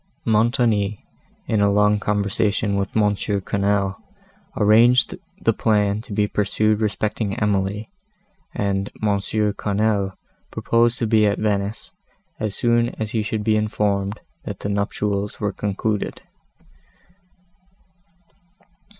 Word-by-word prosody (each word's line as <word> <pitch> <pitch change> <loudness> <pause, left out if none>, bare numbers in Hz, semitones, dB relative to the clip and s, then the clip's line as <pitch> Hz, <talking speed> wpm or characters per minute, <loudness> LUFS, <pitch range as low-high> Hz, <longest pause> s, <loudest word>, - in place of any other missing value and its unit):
Montoni, 110 -2 +1 0.4
in 110 -2 +1
a 100 - +4
long 105 +1 +3
conversation 105 0 0
with 100 +2 -2
M. 105 -1 +3
Quesnel, 100 0 -1 0.6
arranged 115 +4 +5 0.2
the - - +2
plan 105 -1 +1
to 110 - -14
be 105 0 +1
pursued 105 +1 +1
respecting 105 -1 -1
Emily, 105 - -1 0.6
and 100 0 -1
M. 100 -2 +2 0.3
Quesnel 100 -1 0 0.4
proposed 115 +1 +1
to 115 - -1
be 110 -1 +4
at 100 - +1
Venice, 105 0 -2 0.5
as 105 -2 -2
soon 120 0 +2
as 110 -1 -3
he 110 - 0
should 105 0 -2
be 110 0 +2
informed, 105 -1 -1 0.2
that - - -7
the 100 - -3
nuptials 100 0 -2
were 105 -2 -1
concluded. 105 +1 -2
105 Hz, 115 wpm, -22 LUFS, 100-110 Hz, 0.6 s, arranged